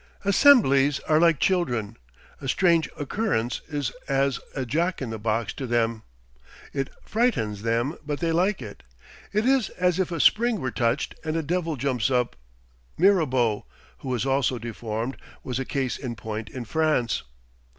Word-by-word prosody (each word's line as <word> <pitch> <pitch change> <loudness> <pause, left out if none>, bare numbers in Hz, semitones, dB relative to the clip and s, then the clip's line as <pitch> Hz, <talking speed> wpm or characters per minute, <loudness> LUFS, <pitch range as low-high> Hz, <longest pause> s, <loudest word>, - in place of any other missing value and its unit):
Assemblies 165 - +5
are 155 0 +2
like 165 -3 +4
children. 120 - 0 0.5
A 135 - -5
strange 170 +1 +3
occurrence 145 - -1
is 145 -4 -2 0.2
as 135 -2 +1 0.2
a 135 -2 -2
Jack 170 +9 0
in 125 -4 -4
the 110 - -5
Box 110 +1 -1
to 135 - -5
them. 115 -1 0 0.7
It 135 -1 -2 0.2
frightens 160 - 0
them; 115 +7 0
but 145 -1 -3
they 165 -1 0
like 180 -1 +1
it. 105 -2 -10 0.5
It 210 +2 +1
is 265 -4 +3
as 180 0 0
if 180 -2 0
a 170 - -3
spring 230 +5 +4
were 130 -4 -2
touched 115 +5 0
and 160 0 -2
a 165 - 0
devil 165 0 -1
jumps 130 -4 0
up. 125 -2 +1 0.6
Mirabeau, 130 - +2 0.3
who 135 - -7
was 125 -1 -1
also 135 -2 +1
deformed, 115 +1 -4 0.3
was 125 -1 -3
a 135 - -2
case 130 -2 -2
in 125 -4 -5
point 110 0 -5
in 125 -2 -6
France. 155 -4 +1
135 Hz, 160 wpm, -25 LUFS, 120-170 Hz, 0.7 s, Assemblies